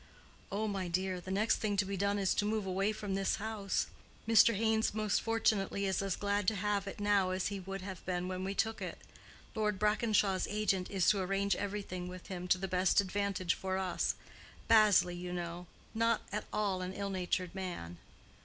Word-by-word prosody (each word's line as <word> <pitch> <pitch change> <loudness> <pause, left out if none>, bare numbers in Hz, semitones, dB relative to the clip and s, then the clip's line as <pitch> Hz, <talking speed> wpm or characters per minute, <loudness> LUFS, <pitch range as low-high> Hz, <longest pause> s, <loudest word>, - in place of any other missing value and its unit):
"Oh, 210 +2 -1
my 195 -3 -2
dear, 185 +1 -1
the 185 - -9
next 205 +4 +2
thing 205 -2 -1
to 195 - +3
be 195 +1 -3
done 200 +1 +1
is 195 -2 +2
to - - +1
move 210 -1 0
away 195 +2 +1
from 210 -2 -4
this 195 0 +1
house. 210 -2 -1 0.4
Mr. 225 0 +6
Haynes 220 0 +1
most 215 -3 +1
fortunately 215 -3 +1
is 190 -1 0
as 195 -2 -1
glad 205 -1 -1
to 220 - +3
have 205 0 -1
it 195 - -6
now 205 -2 +3
as 185 +1 -1
he 200 -1 -4
would 195 +1 -6
have 190 -2 -7
been 180 0 -2
when 185 0 -3
we 195 +1 -3
took 225 +2 0
it. - - -4 0.6
Lord 210 -3 0
Brackenshaw's 210 -2 +2
agent 205 -3 0
is 190 -3 +1
to 200 -2 0
arrange 195 +2 +1
everything 195 -3 -4
with 180 +2 -9
him 180 -1 -5
to 185 - +4
the 190 +1 -3
best 185 +1 +3
advantage 200 -2 0
for 190 0 -2
us: 185 -2 0 0.5
Bazley, 210 -5 +5
you 180 0 -5
know; 175 0 -5 0.3
not 230 0 +2
at 210 +1 -3
all 200 -3 0
an 185 +1 -4
ill 200 0 -3
natured 180 -1 -1
man." 175 - -5
195 Hz, 200 wpm, -33 LUFS, 185-210 Hz, 0.6 s, Mr